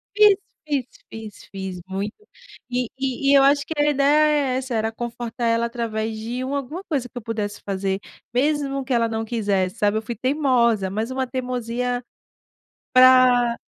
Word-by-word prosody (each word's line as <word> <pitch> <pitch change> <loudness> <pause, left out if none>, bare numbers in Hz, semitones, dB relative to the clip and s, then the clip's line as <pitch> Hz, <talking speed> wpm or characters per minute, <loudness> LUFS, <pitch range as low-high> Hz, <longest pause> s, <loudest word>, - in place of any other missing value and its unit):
fiz, 420 -1 +7 0.3
fiz, 280 -4 0 0.3
fiz, 220 -2 -9
fiz 190 -2 -6
muito. 195 +3 -4 0.5
E 250 -1 -1
e 270 +1 0
e - - +6
eu 270 - +6
acho 285 +1 +4
que 320 - -4
a 295 0 +3
ideia 295 +2 +4 0.2
é - - 0
essa, 260 -1 -4
era 220 0 0
confortar 235 +1 -5
ela 230 0 +2
através 225 -2 -3
de 235 +4 -4
uma 275 +2 -2
alguma 295 +7 -5
coisa 275 -6 -1
que 245 - -11
eu 245 - -4
pudesse 210 -2 -4
fazer. 195 -1 -1 0.3
Mesmo 275 +1 0
que 260 0 -2
ela 230 -1 +2
não 225 0 -2
quisesse, 200 -4 0
sabe. 205 +1 +2
Eu - - -1
fui 230 +2 -5
teimosa, 245 -5 +2
mas 220 +6 -3
uma 260 0 -1
teimosia, 250 -1 -2 0.9
para 255 -2 +6
245 Hz, 175 wpm, -23 LUFS, 220-265 Hz, 0.9 s, fiz